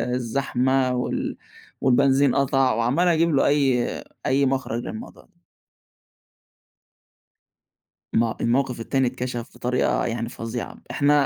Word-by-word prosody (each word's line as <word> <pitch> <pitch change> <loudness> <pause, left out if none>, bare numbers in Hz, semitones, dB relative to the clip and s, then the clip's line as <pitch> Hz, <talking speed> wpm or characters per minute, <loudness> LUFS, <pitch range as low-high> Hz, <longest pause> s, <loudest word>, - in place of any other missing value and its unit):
الزحمة 130 +1 0
وال 125 - -2 0.4
والبنزين 135 +1 +3
قَطع"، 135 -3 +2
وعمّال 125 +10 +1
أجيب 170 0 +3
له 135 - +3
أي 135 -4 +2 0.4
أي 135 +1 +3
مخرج 130 -3 -1
للموضوع 225 +2 -8
ده. 175 -4 -34 2.7
ما 115 +1 +3
هو 110 - -5
الموقف 125 0 +1
التاني 130 +2 0
اتكشف 125 -1 -4
بطريقة 125 +1 0
يعني 115 0 -3
فظيعة. 115 +1 -6 0.2
إحنا 145 -1 +3
130 Hz, 110 wpm, -23 LUFS, 120-140 Hz, 2.7 s, والبنزين